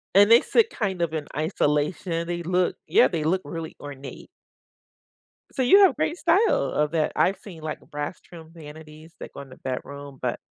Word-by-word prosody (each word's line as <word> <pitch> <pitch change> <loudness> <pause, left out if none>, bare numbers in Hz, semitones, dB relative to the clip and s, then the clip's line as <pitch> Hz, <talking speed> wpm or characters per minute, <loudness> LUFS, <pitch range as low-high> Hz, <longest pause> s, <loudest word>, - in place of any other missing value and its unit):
And 205 +2 +7
they 235 +1 +8
sit 460 -1 +2
kind 190 -6 -3
of 165 -2 -1
in 155 -2 -3
isolation. 155 +2 -1
They 175 0 -3
look 180 +1 0
yeah, 125 - +5
they 160 0 -3
look 185 +4 +1
really 165 -2 -6
ornate. 140 -2 -9 1.2
So 265 - -3
you 385 +11 +6
have 385 - +5
great 340 - -1
style 360 +8 +2
of 150 0 0
that. 160 -2 0
I've 190 +1 +2
seen, 180 -6 -12
like, 155 -1 -5
uh, - - -20
brass 145 +4 -5
trimmed 165 -1 -14
vanities 155 0 -12
that - - -9
go - - -8
in 135 - -12
the 130 - -14
bedroom, 140 +1 -7
but - - -2
165 Hz, 195 wpm, -24 LUFS, 150-185 Hz, 1.2 s, they